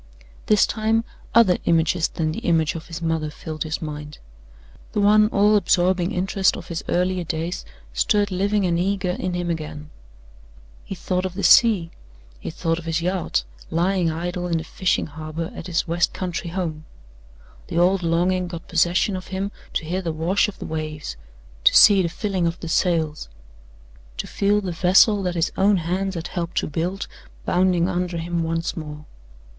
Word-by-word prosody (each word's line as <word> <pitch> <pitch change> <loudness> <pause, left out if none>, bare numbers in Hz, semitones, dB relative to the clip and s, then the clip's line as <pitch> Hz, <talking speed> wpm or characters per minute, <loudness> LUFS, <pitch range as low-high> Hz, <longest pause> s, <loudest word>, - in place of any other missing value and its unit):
This 210 -1 +5
time 220 +1 0 0.3
other 220 -6 +5
images 165 0 +2
than 155 -1 -2
the - - -4
image 160 -3 +1
of 165 -1 -8
his 170 0 -7
mother 160 -2 -1
filled 155 +1 -8
his 155 +2 -2
mind. 150 -1 -7 0.8
The - - 0
one 210 +1 +5
all 210 0 +3
absorbing 180 -1 +2
interest 190 0 +1
of - - -10
his 165 -1 -4
earlier 180 0 +1
days 165 +2 -4 0.3
stirred 205 - +1
living 200 +2 +1
and 170 -1 +1
eager 190 0 0
in 180 0 -3
him 175 -1 -1
again. 150 -2 -6 0.9
He - - -6
thought 185 0 -2
of 185 -1 -4
the 200 - -4
sea; 200 -8 +5 0.5
he - - -6
thought 165 +1 -1
of 170 - -11
his 165 0 -1
yacht 180 - 0 0.3
lying 175 +1 +1
idle 175 +2 -3
in 170 -1 0
the 160 - -3
fishing 180 +3 0
harbor 155 +2 -6
at - - -8
his 175 -1 -1
west 170 +1 +1
country 175 -2 -3
home. 165 -4 -4 0.8
The - - -4
old 185 +2 +3
longing 180 +2 +1
got 170 -1 -8
possession 175 +3 +2
of 185 - -6
him 195 +1 -3 0.2
to 165 - -2
hear 180 +4 -2
the 170 -3 -2
wash 170 +7 +1
of 210 - -8
the - - -7
waves; 155 - -5 0.5
to - - +5
see 200 -2 +8
the 170 - 0
filling 190 -1 -1
of 170 +2 -3
the 165 - -6
sails; 160 - 0 0.9
to - - -3
feel 205 +1 +1
the 190 -3 -3
vessel 190 +4 +4
that 180 -2 -2
his 165 -1 0
own 200 +1 +4
hands 185 +3 -2
had 165 +1 -5
helped 175 -2 -4
to - - +1
build 175 +6 -3 0.4
bounding 180 -1 +2
under 180 -1 -2
him 170 +1 -2
once 165 0 -2
more. 150 -2 -7
175 Hz, 180 wpm, -23 LUFS, 165-190 Hz, 0.9 s, see